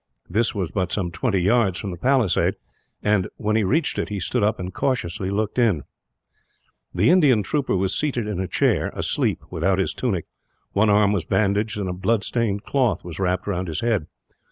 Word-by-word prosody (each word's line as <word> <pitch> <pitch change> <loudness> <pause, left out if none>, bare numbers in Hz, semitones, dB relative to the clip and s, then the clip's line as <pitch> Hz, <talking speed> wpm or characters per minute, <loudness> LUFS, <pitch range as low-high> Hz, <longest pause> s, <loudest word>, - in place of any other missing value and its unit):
This 110 +6 0
was 90 -4 -2
but 90 -3 -1
some 90 -4 -1
twenty 95 +2 0
yards 100 -2 +2
from 100 - -4
the - - -5
palisade 125 -2 +2 0.5
and, 105 -3 +2
when 110 0 0
he 110 - +3
reached 145 - +1
it, - - -2
he 105 -1 -3
stood 120 +7 -1
up 105 +2 +1
and 90 0 -5
cautiously 95 -8 -1
looked 105 +4 -1
in. 100 - +2 1.1
The - - +3
Indian 140 - +4
trooper 140 -7 0
was 95 +1 0
seated 135 -7 -1
in 105 -4 -3
a 95 - -2
chair, - - +1
asleep, - - -1
without 95 -1 +1
his 95 - 0
tunic. 100 -10 -2 0.5
One 105 +2 +3
arm 105 -1 +4
was 95 -6 -1
bandaged, 105 +1 +1
and 100 -2 -2
a 90 - -2
blood 100 +4 0
stained 105 -4 -1
cloth 130 -6 0
was 85 -1 -7
wrapped 90 -1 0
round 95 -2 -2
his 80 -2 -3
head. 110 -9 0
100 Hz, 195 wpm, -23 LUFS, 95-115 Hz, 1.1 s, Indian